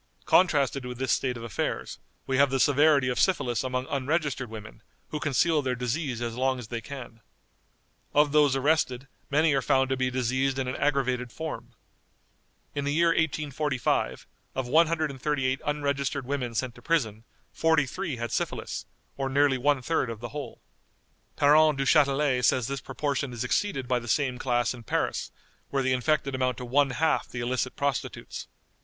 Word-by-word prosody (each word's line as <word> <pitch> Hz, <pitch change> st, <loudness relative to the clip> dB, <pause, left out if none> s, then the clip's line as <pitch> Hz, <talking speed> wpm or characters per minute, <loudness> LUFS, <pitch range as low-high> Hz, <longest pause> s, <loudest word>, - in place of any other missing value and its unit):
_ -, -, -30 dB
Contrasted 140 Hz, -7 st, +3 dB
with 125 Hz, -1 st, -6 dB
this 130 Hz, -2 st, -1 dB
state 125 Hz, +3 st, 0 dB
of 115 Hz, -, -8 dB
affairs, 115 Hz, -4 st, -3 dB, 0.3 s
we 130 Hz, -, 0 dB
have 140 Hz, +1 st, +5 dB
the 135 Hz, 0 st, 0 dB
severity 145 Hz, 0 st, +4 dB
of 125 Hz, -, -1 dB
syphilis 125 Hz, -11 st, +1 dB
among 130 Hz, 0 st, -2 dB
unregistered 140 Hz, -2 st, -1 dB
women, 105 Hz, -, -10 dB, 0.3 s
who 150 Hz, -, -3 dB
conceal 150 Hz, +2 st, +2 dB
their 130 Hz, -2 st, -1 dB
disease 125 Hz, 0 st, -2 dB
as 115 Hz, -1 st, -3 dB
long 130 Hz, +2 st, 0 dB
as 120 Hz, -3 st, -8 dB
they 120 Hz, -1 st, -4 dB
can. 120 Hz, -5 st, -9 dB, 0.9 s
Of 145 Hz, 0 st, +3 dB
those 145 Hz, -2 st, +4 dB
arrested, 135 Hz, -2 st, +1 dB, 0.2 s
many 150 Hz, +1 st, +3 dB
are 135 Hz, -, +2 dB
found 130 Hz, +2 st, +2 dB
to -, -, +2 dB
be 130 Hz, 0 st, +1 dB
diseased 130 Hz, +2 st, 0 dB
in 135 Hz, -1 st, -1 dB
an 125 Hz, -, -2 dB
aggravated 130 Hz, -4 st, 0 dB
form. 160 Hz, -1 st, -6 dB, 1.0 s
In 145 Hz, -, -2 dB
the 140 Hz, -, -1 dB
year 170 Hz, +1 st, +4 dB
1845, 150 Hz, -4 st, 0 dB, 0.3 s
of 130 Hz, -2 st, -2 dB
138 150 Hz, -3 st, +1 dB
unregistered 140 Hz, -2 st, -1 dB
women 125 Hz, -3 st, -3 dB
sent 125 Hz, +1 st, -1 dB
to -, -, -15 dB
prison, 115 Hz, -10 st, 0 dB, 0.3 s
43 160 Hz, +1 st, +1 dB
had 115 Hz, 0 st, -4 dB
syphilis, -, -, -3 dB, 0.3 s
or 135 Hz, -1 st, -1 dB
nearly 140 Hz, -1 st, +3 dB
one 140 Hz, 0 st, +2 dB
third 135 Hz, -3 st, 0 dB
of 115 Hz, -2 st, -6 dB
the 120 Hz, +1 st, -6 dB
whole. 145 Hz, -5 st, -7 dB, 0.7 s
Parent 150 Hz, 0 st, +5 dB
Duchatelet 135 Hz, -2 st, +3 dB
says 125 Hz, 0 st, +3 dB
this 135 Hz, +1 st, -4 dB
proportion 135 Hz, -1 st, -2 dB
is 120 Hz, 0 st, -3 dB
exceeded 135 Hz, -1 st, -1 dB
by 125 Hz, -1 st, +1 dB
the 120 Hz, -, -10 dB
same 130 Hz, 0 st, 0 dB
class 120 Hz, -2 st, +1 dB
in 125 Hz, -, -10 dB
Paris, 115 Hz, -, -2 dB, 0.4 s
where 135 Hz, -1 st, 0 dB
the 130 Hz, 0 st, +2 dB
infected 135 Hz, +1 st, +1 dB
amount 130 Hz, -2 st, 0 dB
to 125 Hz, -, -6 dB
one 140 Hz, +3 st, +3 dB
half 155 Hz, +5 st, +1 dB
the 120 Hz, -, -5 dB
illicit 125 Hz, +1 st, -1 dB
prostitutes. 140 Hz, -3 st, -3 dB
135 Hz, 170 wpm, -27 LUFS, 125-145 Hz, 1.0 s, have